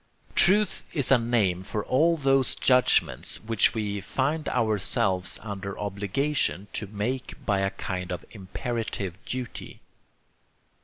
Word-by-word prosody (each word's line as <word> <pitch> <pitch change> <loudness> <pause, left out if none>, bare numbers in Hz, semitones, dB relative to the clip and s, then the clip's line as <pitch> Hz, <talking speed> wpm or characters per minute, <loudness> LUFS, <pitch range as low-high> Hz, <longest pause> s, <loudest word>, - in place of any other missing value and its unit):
Truth 205 +2 +4
is 140 -5 +1
a 130 - +7
name 110 -7 +1
for 105 +2 -4
all 165 +6 +3
those 135 -3 +2
judgments 125 -1 +2
which 110 0 +2
we 105 -2 -2
find 140 +9 -1
ourselves 100 -5 0
under 100 -2 -5
obligation 100 - -1
to 105 - -3
make 110 +6 -3
by 100 -2 +2
a 95 0 +1
kind 90 -2 -5
of 90 -2 -5
imperative 100 -2 -4
duty. 125 -2 -6
110 Hz, 120 wpm, -27 LUFS, 100-130 Hz, -, a